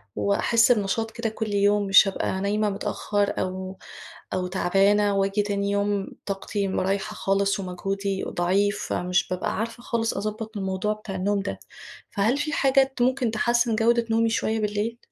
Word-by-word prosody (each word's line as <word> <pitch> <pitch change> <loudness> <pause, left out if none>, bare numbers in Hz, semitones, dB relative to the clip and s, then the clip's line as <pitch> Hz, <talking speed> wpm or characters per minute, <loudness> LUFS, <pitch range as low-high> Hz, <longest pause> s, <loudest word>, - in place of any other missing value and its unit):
وأحسّ 225 +4 +3
بنشاط 225 +1 0
كده 235 -1 -3
كل 215 -1 -4
يوم، 205 0 +2
مش 195 +1 +7
ابقى 190 0 -2
نايمة 210 +1 +1
متأخر 205 0 -1
أو 185 0 -4 0.6
أو 180 -1 -1
تعبانة 200 +3 +2
وآجي 195 +1 +1
تاني 200 -1 -1
يوم 200 -1 0 0.2
طاقتي 200 0 -2
م 190 - -1
رايحة 195 +2 -1
خالص 195 +1 +1
ومجهودي 195 +1 -3
ضعيف، 195 +4 0
فمش 180 +1 0
بابقى 185 +1 -2
عارفة 230 +1 -4
خالص 230 -1 -1
أضبط 215 +1 -4
الموضوع 190 +2 -1
بتاع 210 -2 -8
النوم 200 +2 0
ده، 200 - -5 0.5
فهل 225 +6 +1
في 305 +2 -2
حاجة 270 -1 +3
ت - - -2
ممكن 255 -1 +2
تحسن 235 +1 +1
جودة 235 +1 +2
نومي 225 0 +3
شوية 225 0 0
بالليل؟ 210 +2 -2
205 Hz, 160 wpm, -25 LUFS, 195-225 Hz, 0.6 s, مش